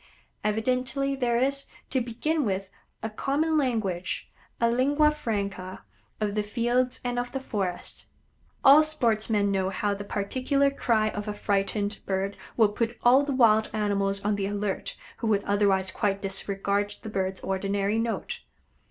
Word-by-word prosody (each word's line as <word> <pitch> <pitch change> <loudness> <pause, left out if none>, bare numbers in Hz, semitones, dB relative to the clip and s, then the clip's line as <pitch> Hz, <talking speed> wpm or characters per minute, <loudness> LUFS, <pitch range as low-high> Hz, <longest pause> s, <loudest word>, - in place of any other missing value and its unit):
Evidently 255 +6 0
there 245 -3 +1
is, 275 +2 0 0.2
to 260 - +1
begin 285 +7 -1
with, 195 -3 -2 0.3
a 220 - -1
common 295 +8 0
language 220 - -1 0.3
a 235 - +3
lingua 285 +6 +3
franca 200 - -4 0.4
of 210 -1 -1
the 210 - +1
fields 240 +4 0
and 245 0 0
of 245 0 -3
the 270 - -1
forests. 195 -8 -3 0.6
All 280 +3 +9
sportsmen 225 -9 +1
know 190 -1 +1
how 205 +1 -1
the 200 0 -5
particular 260 +8 0
cry 225 -5 +1
of 205 0 -5
a 210 - -3
frightened 205 +1 -1
bird 195 +1 -1 0.2
will 220 -3 +5
put 230 +3 -2
all 250 +3 +7
the 285 0 -2
wild 220 -3 +5
animals 200 -2 0
on 210 0 +1
the 195 -1 -1
alert 205 -1 -3 0.2
who 230 - -3
would 205 -2 +2
otherwise 200 -2 +2
quite 200 -2 0
disregard 200 +1 -1
the 220 - -5
bird's 190 -1 -2
ordinary 200 +2 0
note. 230 0 -2
215 Hz, 150 wpm, -27 LUFS, 200-250 Hz, 0.6 s, All